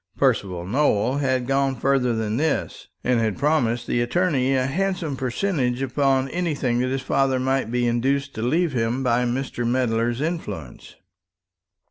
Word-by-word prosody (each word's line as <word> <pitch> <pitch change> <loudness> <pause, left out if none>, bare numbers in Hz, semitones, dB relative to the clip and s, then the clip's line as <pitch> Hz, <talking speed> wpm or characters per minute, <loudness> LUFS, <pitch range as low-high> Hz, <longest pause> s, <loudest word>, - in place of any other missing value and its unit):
Percival 90 -3 +1
Nowell 125 +1 +1
had 130 -3 0
gone 135 0 +1
farther 125 -1 +1
than 110 0 -1
this, 155 +1 -1 0.2
and 125 -1 +2
had 110 -3 0
promised 125 -5 +1
the 120 - 0
attorney 135 -1 +1
a 130 -1 +1
handsome 175 0 -1
percentage 130 -1 -1
upon 135 0 +1
anything 145 -7 -1
that 130 +1 0
his 135 0 -2
father 135 -1 +1
might 130 -2 0
be 120 +1 0
induced 135 +4 0
to 110 - -5
leave 160 +6 +1
him 120 +2 0
by 125 -1 +2
Mr. 120 0 -2
Medler's 120 -1 0
influence. 105 - -5
130 Hz, 150 wpm, -23 LUFS, 120-140 Hz, 0.2 s, and